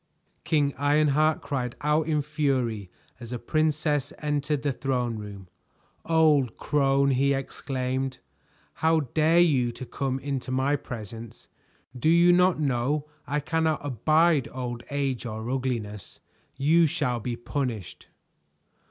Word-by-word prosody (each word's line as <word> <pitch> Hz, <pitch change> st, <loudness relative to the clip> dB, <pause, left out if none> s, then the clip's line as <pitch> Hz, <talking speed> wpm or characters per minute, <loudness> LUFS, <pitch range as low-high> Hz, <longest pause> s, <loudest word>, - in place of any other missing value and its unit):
King 145 Hz, -3 st, +1 dB
Ironheart 150 Hz, +1 st, +3 dB
cried 130 Hz, -4 st, -3 dB
out 150 Hz, +1 st, +1 dB
in 150 Hz, -2 st, +1 dB
fury 130 Hz, -, -1 dB, 0.3 s
as 120 Hz, -2 st, -9 dB
the 125 Hz, -, -3 dB
princess 150 Hz, +1 st, 0 dB
entered 150 Hz, -1 st, -1 dB
the 145 Hz, -2 st, 0 dB
throne 125 Hz, -4 st, -2 dB
room. 100 Hz, -3 st, -9 dB, 0.6 s
"Old 155 Hz, -6 st, +3 dB
crone!" 140 Hz, -1 st, +2 dB
he 140 Hz, +2 st, +2 dB
exclaimed. 130 Hz, -1 st, -3 dB, 0.6 s
"How 160 Hz, 0 st, +3 dB
dare 155 Hz, +5 st, +2 dB
you 140 Hz, -9 st, +4 dB
to 130 Hz, -, -7 dB
come 130 Hz, +2 st, -2 dB
into 135 Hz, -2 st, -4 dB
my 130 Hz, +3 st, +1 dB
presence? 115 Hz, -3 st, -8 dB, 0.5 s
Do 125 Hz, +5 st, +1 dB
you 170 Hz, +1 st, +6 dB
not 180 Hz, -1 st, +3 dB
know 140 Hz, +1 st, 0 dB, 0.2 s
I 145 Hz, +1 st, 0 dB
cannot 160 Hz, 0 st, 0 dB
abide 155 Hz, +3 st, +2 dB
old 120 Hz, -2 st, -5 dB
age 135 Hz, -3 st, -2 dB
or 110 Hz, 0 st, -5 dB
ugliness? 115 Hz, -7 st, -4 dB, 0.4 s
You 160 Hz, +4 st, +4 dB
shall 125 Hz, -4 st, -1 dB
be 120 Hz, +2 st, -3 dB
punished." 120 Hz, -6 st, -4 dB
140 Hz, 125 wpm, -26 LUFS, 125-150 Hz, 0.6 s, you